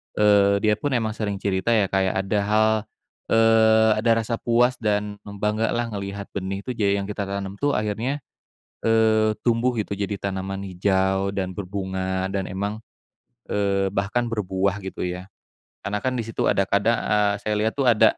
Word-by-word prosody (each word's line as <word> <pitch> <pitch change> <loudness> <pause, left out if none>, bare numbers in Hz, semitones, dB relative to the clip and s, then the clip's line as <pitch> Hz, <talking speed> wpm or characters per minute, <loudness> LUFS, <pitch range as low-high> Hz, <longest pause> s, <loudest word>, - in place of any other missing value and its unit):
eee, 100 -1 +4
dia 105 0 +4
pun 145 - -1
emang 110 -2 0
sering 105 -2 -3
cerita, 95 0 -2
ya, 100 -4 +1
kayak 95 -1 +1
ada 105 +2 -1
hal, 110 +1 +4 0.6
eee, 110 0 +5
ada 115 +1 +2
rasa 115 +1 -2
puas 120 +2 +2
dan 105 -1 -1 0.2
bangga 105 +2 +1
lah 120 -1 -2
ngelihat 100 0 -5
benih 95 0 -4
itu 130 - -4
jadi 100 -4 +1
yang - - -6
kita 100 -1 -3
tanam 100 0 -4
tuh 145 0 +1
akhirnya, 115 +7 -2 0.6
eee, 110 -1 +3
tumbuh 120 +1 +2
gitu, 105 -1 -2
jadi 100 0 -3
tanaman 95 0 -4
hijau 95 +1 +1
dan 95 -2 -3
berbunga, 95 -1 -3
dan 95 -1 -2
emang, 100 +3 -3 0.7
eee, 100 -1 +1
bahkan 105 +5 -1
berbuah 100 -2 -1
gitu, 95 - -6
ya. 90 0 -3 0.6
Karena 105 +1 -1
kan 130 0 -1
di 115 - -1
situ 115 - -1
ada, 100 - +2
kadang, 100 +4 +2
eee, 105 -1 +2
saya 105 - -1
lihat 110 +5 -1
tuh 135 - +1
ada 115 -2 +5
105 Hz, 170 wpm, -23 LUFS, 95-110 Hz, 0.7 s, eee